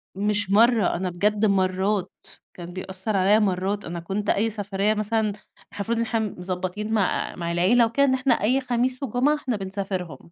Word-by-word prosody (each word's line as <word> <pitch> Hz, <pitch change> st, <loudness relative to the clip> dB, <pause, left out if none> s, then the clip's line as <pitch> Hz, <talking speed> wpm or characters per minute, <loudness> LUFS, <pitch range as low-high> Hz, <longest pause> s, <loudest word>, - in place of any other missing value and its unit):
مش 205 Hz, 0 st, -1 dB
مرّة، 225 Hz, -1 st, +4 dB
أنا 185 Hz, +1 st, -2 dB
بجد 210 Hz, +4 st, +1 dB
مرّات، 190 Hz, 0 st, +1 dB, 0.4 s
كان 175 Hz, 0 st, -9 dB
بيأثر 190 Hz, +3 st, -3 dB
عليَّ 195 Hz, +3 st, +4 dB
مرّات، 195 Hz, 0 st, -1 dB
أنا 170 Hz, +1 st, -5 dB
كنت 195 Hz, +5 st, -3 dB
أي 220 Hz, +3 st, +2 dB
سفرية 205 Hz, -1 st, -1 dB
مثلًا 215 Hz, +1 st, 0 dB
إحنا 200 Hz, -, -5 dB, 0.4 s
المفروض 205 Hz, +3 st, -2 dB
إن 230 Hz, -, +1 dB
إحنا 225 Hz, 0 st, -1 dB
مضبطين 185 Hz, 0 st, -4 dB
مع 200 Hz, -4 st, 0 dB
مع 170 Hz, -1 st, -3 dB
العيلة 190 Hz, +8 st, +4 dB
وكده 255 Hz, +5 st, +2 dB
إن 265 Hz, -, +2 dB
إحنا 260 Hz, -1 st, +2 dB
أي 255 Hz, +6 st, +2 dB
خميس 250 Hz, +1 st, -1 dB
وجمعة 265 Hz, +4 st, +2 dB
إحنا 260 Hz, -6 st, -3 dB
بنسافرهم، 190 Hz, -6 st, -5 dB
205 Hz, 175 wpm, -24 LUFS, 185-225 Hz, 0.4 s, مرّة